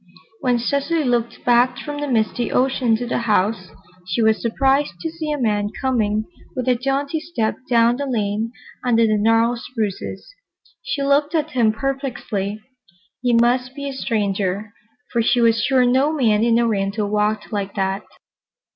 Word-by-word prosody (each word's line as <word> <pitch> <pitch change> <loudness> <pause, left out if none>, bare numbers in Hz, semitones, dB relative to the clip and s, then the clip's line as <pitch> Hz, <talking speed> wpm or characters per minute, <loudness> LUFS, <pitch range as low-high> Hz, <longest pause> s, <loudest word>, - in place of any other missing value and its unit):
When 250 -1 +1
Cecily 280 +6 0
looked 240 -2 -1
back 245 +1 +4
from 290 -1 -5
the 290 - -2
misty 235 -1 0
ocean 255 -3 +2
to 245 +2 -3
the 245 - -1
house, 210 -3 +1 0.4
she 180 +5 -1
was 220 0 +3
surprised 270 +5 +1
to 325 - -4
see 315 -2 -4
a 295 - -1
man 210 -5 0
coming 220 -5 0 0.3
with 255 - -3
a 255 - +5
jaunty 275 +5 -1
step 305 -9 -2
down 235 0 +4
the 285 0 -3
lane 220 -2 -1 0.3
under 230 -2 +3
the 215 -1 +2
gnarled 225 +2 +3
spruces. 220 -6 -4 0.5
She - - -2
looked 285 +3 +2
at 310 -1 0
him 235 -5 +3
perplexedly. 225 -5 -3 0.6
He 245 -1 +1
must 250 +2 +2
be 280 -1 -5
a - - -5
stranger, 205 -4 -2 0.4
for 235 - +1
she 235 +2 +2
was 230 -1 +3
sure 255 +1 +3
no 260 +4 +3
man 225 -8 +2
in 230 0 +3
Oriental 210 -2 0
walked 210 +2 -1
like 200 -1 -3
that. 195 0 -1
235 Hz, 165 wpm, -21 LUFS, 215-270 Hz, 0.6 s, a